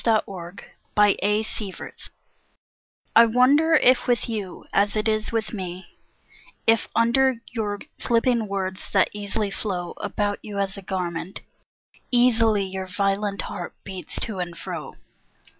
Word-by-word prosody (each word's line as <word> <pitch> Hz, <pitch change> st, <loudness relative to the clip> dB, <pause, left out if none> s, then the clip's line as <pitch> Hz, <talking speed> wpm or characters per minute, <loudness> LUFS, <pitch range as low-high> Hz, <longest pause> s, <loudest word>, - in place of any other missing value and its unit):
AFTER 195 Hz, -6 st, 0 dB, 0.4 s
MANY 205 Hz, -1 st, +6 dB
DAYS 210 Hz, -1 st, -3 dB, 1.1 s
I 230 Hz, -, +9 dB
WONDER 280 Hz, +8 st, +5 dB
if 255 Hz, -4 st, +5 dB
with 245 Hz, -1 st, +1 dB
you, 210 Hz, -6 st, -5 dB
as 205 Hz, +1 st, +2 dB
it 215 Hz, +1 st, 0 dB
is 215 Hz, 0 st, 0 dB
with 225 Hz, -1 st, -2 dB
me, 185 Hz, -2 st, -7 dB, 0.7 s
If 225 Hz, 0 st, +4 dB
under 255 Hz, +3 st, +4 dB, 0.2 s
your 210 Hz, -3 st, -2 dB, 0.2 s
slipping 235 Hz, -1 st, +2 dB
words, 190 Hz, -1 st, -3 dB
that 190 Hz, -2 st, +4 dB
easily 205 Hz, 0 st, -2 dB
flow 180 Hz, -4 st, -3 dB
About 205 Hz, 0 st, -2 dB
you 205 Hz, -1 st, -7 dB
as 195 Hz, 0 st, -1 dB
a 200 Hz, -, -7 dB
garment, 180 Hz, -1 st, -4 dB, 0.7 s
easily, 225 Hz, -4 st, +4 dB
Your 190 Hz, 0 st, -5 dB
violent 200 Hz, +2 st, 0 dB
heart -, -, -6 dB
beats 190 Hz, -2 st, -7 dB
to 215 Hz, -5 st, -4 dB
and 175 Hz, -1 st, -4 dB
fro! -, -, -6 dB
205 Hz, 130 wpm, -24 LUFS, 190-225 Hz, 1.1 s, I